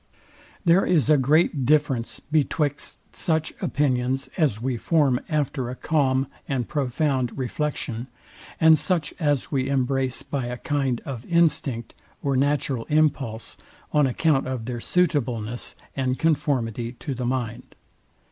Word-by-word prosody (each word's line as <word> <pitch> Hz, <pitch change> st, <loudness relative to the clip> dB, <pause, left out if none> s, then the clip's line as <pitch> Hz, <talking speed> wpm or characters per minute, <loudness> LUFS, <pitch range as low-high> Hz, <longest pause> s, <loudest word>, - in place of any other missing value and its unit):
There 175 Hz, +3 st, +5 dB
is 155 Hz, -4 st, +3 dB
a 150 Hz, -, +6 dB
great 145 Hz, +1 st, +3 dB
difference 135 Hz, -4 st, +1 dB
betwixt 150 Hz, -1 st, -1 dB
such 160 Hz, -2 st, 0 dB
opinions 130 Hz, -1 st, 0 dB
as 145 Hz, -, +1 dB
we 125 Hz, +2 st, -1 dB
form 135 Hz, 0 st, +2 dB
after 145 Hz, -5 st, -1 dB
a 125 Hz, -, -5 dB
calm 135 Hz, -3 st, +1 dB, 0.2 s
and 130 Hz, -4 st, -1 dB
profound 135 Hz, -2 st, 0 dB
reflection, 130 Hz, -3 st, -3 dB, 0.5 s
and 160 Hz, -1 st, +6 dB
such 165 Hz, +1 st, 0 dB
as 145 Hz, -5 st, 0 dB
we 135 Hz, -1 st, 0 dB
embrace 135 Hz, -1 st, 0 dB
by 135 Hz, -4 st, -3 dB
a 125 Hz, 0 st, -4 dB
kind 135 Hz, -4 st, -1 dB
of 125 Hz, -4 st, -5 dB
instinct 150 Hz, -9 st, +1 dB, 0.3 s
or 140 Hz, -1 st, +1 dB
natural 135 Hz, -3 st, +1 dB
impulse, 140 Hz, -7 st, 0 dB, 0.4 s
on 150 Hz, -2 st, +4 dB
account 135 Hz, +1 st, +1 dB
of 130 Hz, -4 st, -3 dB
their 120 Hz, 0 st, -4 dB
suitableness 120 Hz, -10 st, 0 dB, 0.2 s
and 130 Hz, -1 st, 0 dB
conformity 130 Hz, -7 st, 0 dB
to 135 Hz, +3 st, -5 dB
the 125 Hz, -1 st, -4 dB
mind. 120 Hz, -3 st, -3 dB
135 Hz, 130 wpm, -24 LUFS, 125-150 Hz, 0.5 s, a